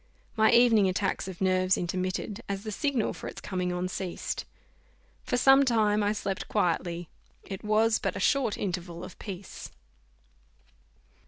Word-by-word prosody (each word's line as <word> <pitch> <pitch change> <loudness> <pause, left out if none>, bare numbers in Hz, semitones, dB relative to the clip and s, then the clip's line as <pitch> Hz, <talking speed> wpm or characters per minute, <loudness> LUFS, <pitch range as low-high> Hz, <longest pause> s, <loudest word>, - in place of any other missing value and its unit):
My 220 -1 +4
evening 235 -5 +5
attack 190 +1 -1
of 190 -1 -8
nerves 185 0 +3
intermitted, 185 +4 -3
as 195 0 -3
the 215 - -4
signal 265 0 0
for - - -8
its - - -7
coming 180 -2 -2
on, 180 +1 -2
ceased. 185 -1 -4 0.8
For - - -1
some 270 +2 +6
time 215 -4 +2
I 205 0 +2
slept 195 -2 -3
quietly: 175 0 -1 0.4
it 195 -2 -7
was 220 +1 +3
but - - -2
a - - -3
short 265 -7 +2
interval 175 -2 -4
of 185 - -10
peace. 195 -2 -8
195 Hz, 150 wpm, -28 LUFS, 185-220 Hz, 0.8 s, some